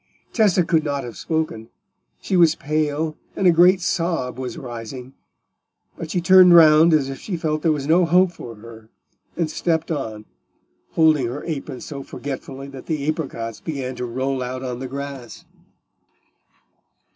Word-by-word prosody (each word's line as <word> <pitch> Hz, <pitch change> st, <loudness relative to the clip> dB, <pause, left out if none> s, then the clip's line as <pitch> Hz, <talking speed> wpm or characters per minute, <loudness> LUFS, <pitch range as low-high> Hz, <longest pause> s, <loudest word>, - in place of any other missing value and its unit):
Tessa 200 Hz, -6 st, +3 dB
could 160 Hz, -2 st, +2 dB
not 140 Hz, -2 st, -2 dB
have 120 Hz, -2 st, -8 dB
spoken; 155 Hz, -9 st, -3 dB, 0.5 s
she 190 Hz, -, -2 dB
was 170 Hz, -3 st, +5 dB
pale, 155 Hz, +1 st, -1 dB, 0.2 s
and 195 Hz, -, -1 dB
a 180 Hz, -, +7 dB
great 180 Hz, +3 st, +5 dB
sob 165 Hz, -8 st, -1 dB
was 130 Hz, +5 st, -5 dB
rising; 125 Hz, -1 st, -8 dB, 0.8 s
but 165 Hz, -, -7 dB
she 180 Hz, -, -1 dB
turned 180 Hz, 0 st, +7 dB
round 160 Hz, 0 st, +7 dB
as 150 Hz, -4 st, +3 dB
if 135 Hz, 0 st, -6 dB
she 185 Hz, -5 st, -4 dB
felt 155 Hz, -1 st, -2 dB
there 165 Hz, -, +2 dB
was 145 Hz, -3 st, -2 dB
no 170 Hz, +4 st, +4 dB
hope 180 Hz, +2 st, +4 dB
for 120 Hz, -9 st, -10 dB
her, 110 Hz, 0 st, -13 dB, 0.5 s
and 170 Hz, -2 st, 0 dB
stepped 165 Hz, -1 st, -1 dB
on, 110 Hz, -8 st, -4 dB, 0.7 s
holding 155 Hz, -6 st, +3 dB
her 130 Hz, +5 st, -6 dB
apron 140 Hz, -5 st, -5 dB
so 140 Hz, -2 st, -7 dB
forgetfully 135 Hz, 0 st, -7 dB
that 135 Hz, -2 st, -11 dB
the 150 Hz, -3 st, -2 dB
apricots 115 Hz, -8 st, -4 dB
began 135 Hz, -5 st, -4 dB
to 125 Hz, -, -4 dB
roll 130 Hz, +2 st, -2 dB
out 125 Hz, +1 st, -5 dB
on 125 Hz, -2 st, -4 dB
the 130 Hz, -, -5 dB
grass. 140 Hz, -2 st, -8 dB
145 Hz, 160 wpm, -21 LUFS, 130-165 Hz, 0.8 s, a